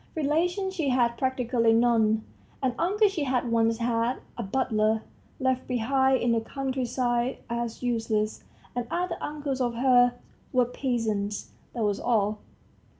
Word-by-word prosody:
Relations 345 +6 0
she 320 -7 -1
had 250 -2 +3
practically 245 -2 +1
none; 225 -2 +3 0.4
an 255 -2 +2
uncle 410 +6 +3
she 380 -6 -2
had 250 -2 0
once 230 0 +2
had, 235 +1 0 0.2
a - - -4
butler, 220 -1 +1 0.4
left 260 -1 0
behind 265 +2 +2
in 240 - +2
the 230 -1 +2
country 265 +1 -3 0.6
as 235 0 -3
useless, 225 -3 -1 0.3
and 245 -1 -2
other 355 0 -1
uncles 290 -3 -3
of 240 -2 0
hers 245 0 +5 0.4
were 250 -1 +3
peasants 225 -5 -2 0.2
that 235 - -1
was 205 -1 0
all. 215 -3 +1
245 Hz, 140 wpm, -27 LUFS, 225-265 Hz, 0.6 s, hers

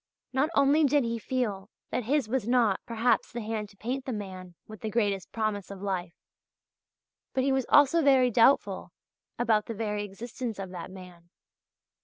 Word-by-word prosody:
Not 270 +4 +2
only 280 +3 +4
did 290 -1 +3
he 230 0 -2
feel 215 -5 -2 0.2
that 250 - -2
his 275 0 +1
was 235 -2 -1
not, 235 -5 +3
perhaps, 230 +1 +1
the 235 - -4
hand 215 -1 -4
to 200 - -20
paint 255 +5 -3
the 260 - -3
man 185 -5 -7
with 215 -3 -11
the 220 - -3
greatest 205 -5 -1
promise 215 -3 -2
of 200 -1 -8
life; 185 -3 -3 1.2
but 260 - +2
he 275 - +2
was 265 -2 0
also 290 +3 +6
very 265 -4 +5
doubtful 235 +5 +3 0.4
about 225 -3 +2
the 230 - -4
very 210 -1 -2
existence 225 +3 -6
of 190 -2 -6
that 180 0 -7
man. 180 -2 -13
225 Hz, 175 wpm, -28 LUFS, 200-255 Hz, 1.2 s, also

